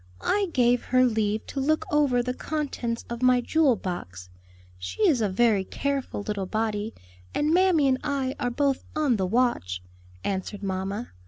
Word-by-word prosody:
"I 405 - +1
gave 245 -2 +2
her 255 0 +4
leave 220 -2 0
to 275 - -5
look 310 +3 +1
over 280 -5 +3
the 250 +1 -2
contents 255 -6 -3
of 235 0 -6
my 255 0 +5
jewel 285 0 +3
box; 95 - -6 0.5
she 90 0 0
is 265 -7 +3
a 210 - +2
very 205 0 +3
careful 275 -1 -3
little 200 -2 -3
body, 215 +1 -2 0.4
and 300 +2 +2
mammy 355 -5 +4
and 260 -1 +2
I 275 -3 -1
are 245 - 0
both 275 +2 0
on 290 -7 +2
the 190 -2 0
watch:" 180 - 0 0.4
answered 200 +1 -3
mamma. 195 +4 -3
240 Hz, 165 wpm, -26 LUFS, 205-275 Hz, 0.5 s, my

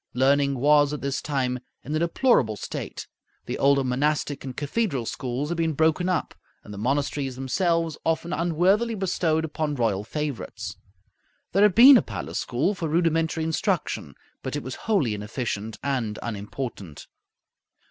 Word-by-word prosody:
Learning 140 +2 +3
was 145 +2 +4
at 150 - -4
this 140 0 -2
time 130 -4 -1 0.2
in 150 - -3
a - - +1
deplorable 170 - +2
state. - - -6 0.4
The - - -4
older 140 0 +4
monastic 145 +3 0
and 130 -2 -7
cathedral 145 - -1
schools 130 +5 -3
had 170 0 -2
been 165 -1 +1
broken 160 +4 +2
up, 185 - -1 0.3
and 105 - -10
the 100 - -7
monasteries 135 +2 -1
themselves 165 +4 0
often 165 +2 -1
unworthily 185 +8 +2
bestowed 165 -5 0
upon 155 -1 -2
royal 110 -6 0
favorites. 150 +2 -5 0.8
There 195 - +2
had 205 -3 +5
been 255 +3 +10
a - - +3
palace - - -5
school 135 +12 0
for 180 -5 -3
rudimentary 165 0 +1
instruction, 160 0 -1 0.3
but - - -4
it - - -3
was - - -5 0.2
wholly 160 - +2
inefficient 105 0 -4
and 125 -7 -1
unimportant. 105 - -6
145 Hz, 150 wpm, -25 LUFS, 125-165 Hz, 0.8 s, been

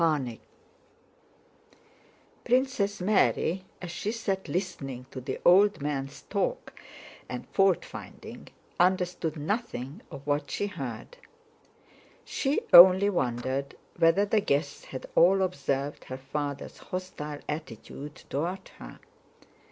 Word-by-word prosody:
CHAPTER 150 -7 +2
IV 115 - -12 2.0
Princess 245 -6 +1
Mary 190 -2 +2 0.2
as 175 - -5
she 190 +5 -3
sat 200 -4 -2
listening 140 -9 -4
to 130 - -6
the 125 - -4
old 200 +4 +6
men's 140 -1 -4
talk - - -2 0.6
and - - -5
faultfinding, 195 -2 -1 0.3
understood 180 -3 +1
nothing 160 - -3
of 140 -3 -10
what 145 0 0
she - - -1
heard; 165 - -6 1.1
she 275 +1 0
only 190 +3 +10
wondered 130 -2 -2 0.2
whether 165 +5 +4
the 210 +1 +2
guests 145 -6 -1
had 130 - -7
all 190 +3 +5
observed 140 -5 -2
her 130 - -6
father's 140 +1 -5
hostile 150 -5 -6
attitude 150 0 -6
toward 175 +7 -3
her. - - -10
170 Hz, 110 wpm, -28 LUFS, 140-195 Hz, 2.0 s, only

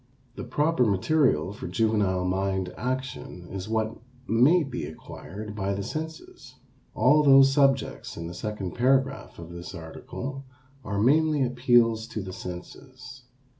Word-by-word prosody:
The - - -6
proper 145 +3 +1
material 100 - +2
for 105 - -7
juvenile 95 -2 +1
mind 95 0 -1
action 125 -8 -4
is 95 +1 -5
what 110 0 -1 0.3
may 140 +10 +4
be 135 -3 -5
acquired 100 +6 -9
by 100 -1 -1
the 100 - -3
senses. 160 - -7 0.4
All 150 +1 +5
those 135 -1 +7
subjects 135 -2 +1
in 85 - -5
the 85 - -6
second 100 0 -4
paragraph 135 +2 +1
of 85 0 -9
this 85 0 -8
article 130 +11 -7 0.4
are 100 0 -3
mainly 150 +5 +3
appeals 120 -3 +3
to 110 - -5
the 95 -1 -7
senses. 125 +9 -9
115 Hz, 135 wpm, -26 LUFS, 95-135 Hz, 0.4 s, those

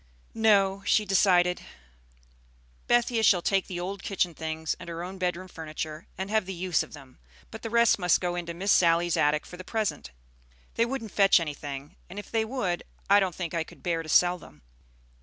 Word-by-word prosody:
"No," 200 -3 +3
she 210 +1 +2
decided. 180 -2 +3 1.3
"Bethia 240 -1 +2
shall 190 -5 +4
take 195 -2 +1
the 180 -2 -5
old 195 +3 -5
kitchen 180 -4 -1
things 160 0 -3
and 175 -1 -9
her 170 0 -5
own 185 +1 -7
bedroom 180 0 -2
furniture, 155 -1 -7
and 190 +2 -4
have 215 -3 +1
the 190 - -5
use 175 -2 0
of - - -8
them; 135 -4 -14 0.3
but 220 - -8
the 225 - -5
rest 235 -2 +4
must 180 -1 +3
go 175 -1 -2
into 170 -1 -5
Miss 195 +4 0
Sally's 170 0 +4
attic 150 +1 +2
for 180 - -11
the 185 - -8
present. 215 - -3 0.6
They 230 - +1
wouldn't 235 -5 -5
fetch 195 -2 +5
anything; 145 -3 -6
and 190 - -10
if 205 - -8
they 225 -1 +1
would, 220 -8 -2 0.3
I 200 - +8
don't 190 -3 -1
think 175 -3 -5
I 165 -1 0
could - - -17
bear 170 -2 0
to 160 - -10
sell 180 +2 +4
them. 75 - -16
180 Hz, 195 wpm, -27 LUFS, 165-200 Hz, 1.3 s, I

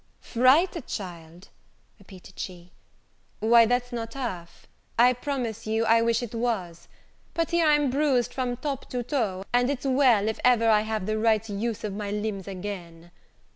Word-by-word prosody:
"Fright, 270 +6 +2
child!" 175 -2 -8 0.5
repeated 190 -1 -15
she, 180 -1 -7 0.7
"why 230 +1 +5
that's 245 +1 0
not 230 0 -5
half: 185 -11 -6 0.3
I 245 +2 +6
promise 245 -4 -4
you, 220 +1 +1
I 230 +1 +4
wish 230 +1 +1
it 240 - -7
was: 220 -8 -3 0.5
but 330 -1 -1
here 340 -2 +3
I'm 295 -3 +3
bruised 270 -4 +1
from 250 -2 -2
top 275 0 -5
to 245 -1 -3
toe 220 -8 -2
and 245 +1 +3
it's 280 -1 -3
well 255 -6 +3
if 220 - -2
ever 240 -2 +4
I 215 -1 +5
have 215 -2 -3
the 215 +1 -1
right 220 -1 +2
use 215 +2 -3
of 210 -2 -3
my 205 0 -4
limbs 205 -2 -3
again. 180 -3 -7
225 Hz, 165 wpm, -26 LUFS, 200-250 Hz, 0.7 s, I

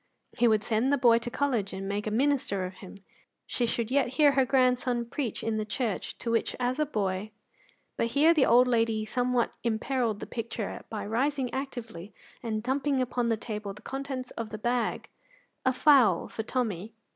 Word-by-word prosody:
He 240 0 +3
would 215 -2 +3
send 230 +5 +1
the 285 - +3
boy 235 -3 +5
to 240 +1 -5
college 240 -7 -1
and 195 0 -5
make 205 +2 -2
a - - +1
minister 235 -5 +1
of 185 - -6
him; 195 +1 -12 0.4
she 240 - -1
should 230 0 -2
yet 280 0 +3
hear 295 -2 +6
her 270 -1 +3
grandson 250 -2 +2
preach 235 -1 -4
in 225 -1 -1
the 215 - -1
church 215 -1 -3
to 230 - -3
which 230 - 0
as 250 +3 0
a 305 - +1
boy 200 -4 -2 0.7
But 230 - +1
here 295 +7 +4
the 305 -5 +3
old 245 +2 +6
lady 225 -3 +1
somewhat 245 +1 0
imperilled 235 -1 0
the - - -5
picture 230 -2 -5
by 215 - -4
rising 260 +4 -1
actively 230 -8 -6 0.3
and 220 -2 -3
dumping 270 +2 0
upon 245 -1 0
the 225 - +1
table 210 -3 -5
the 210 - -15
contents 270 -2 -5
of 230 -2 -5
the 215 - -6
bag 240 +1 -1 0.6
a 260 - +3
fowl 255 - +4
for - - -5
Tommy. 220 -3 -3
235 Hz, 190 wpm, -28 LUFS, 215-260 Hz, 0.7 s, hear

